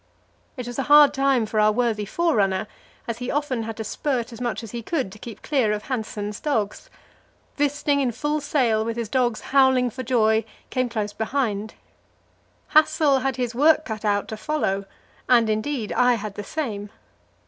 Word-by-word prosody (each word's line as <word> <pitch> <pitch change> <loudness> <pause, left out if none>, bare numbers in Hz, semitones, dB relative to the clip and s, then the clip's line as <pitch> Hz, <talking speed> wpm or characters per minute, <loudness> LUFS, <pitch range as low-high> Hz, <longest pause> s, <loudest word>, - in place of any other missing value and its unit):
It 250 - -5
was 245 +2 -5
a 270 - -3
hard 295 -1 +8
time 270 -4 +2
for 215 0 -1
our 215 0 +5
worthy 225 -2 0
forerunner; 205 - +1 0.5
he 250 0 -4
often 285 -5 -1
had 225 0 -6
to 220 - -3
spurt 245 0 -2
as 230 - -10
much 240 -1 -2
as 220 - -8
he 235 - -5
could 265 - -2
to 215 - -13
keep 230 -1 -10
clear 260 -8 +1
of 210 0 -4
Hanssen's 210 -4 -4
dogs. 275 - -2 0.7
Wisting 290 0 +1
in 255 -3 +1
full 295 +5 -2
sail, 250 -7 +1
with 230 +1 -3
his 230 -3 -3
dogs 240 -2 0
howling 260 -3 +4
for 255 - -6
joy, 220 -3 +2 0.3
came 255 -1 0
close 210 -3 -3
behind. 220 -2 -2 0.9
Hassel 310 -3 +4
had 265 0 -1
his 245 -1 -2
work 310 +5 +4
cut 220 -2 -5
out 205 -1 +1
to 220 - -5
follow, 215 -7 -1 0.4
and, 235 -3 +5
indeed, 215 +1 -2
I 250 0 +4
had 215 -2 -5
the 205 - -6
same. 210 -6 -4
240 Hz, 180 wpm, -23 LUFS, 215-275 Hz, 0.9 s, hard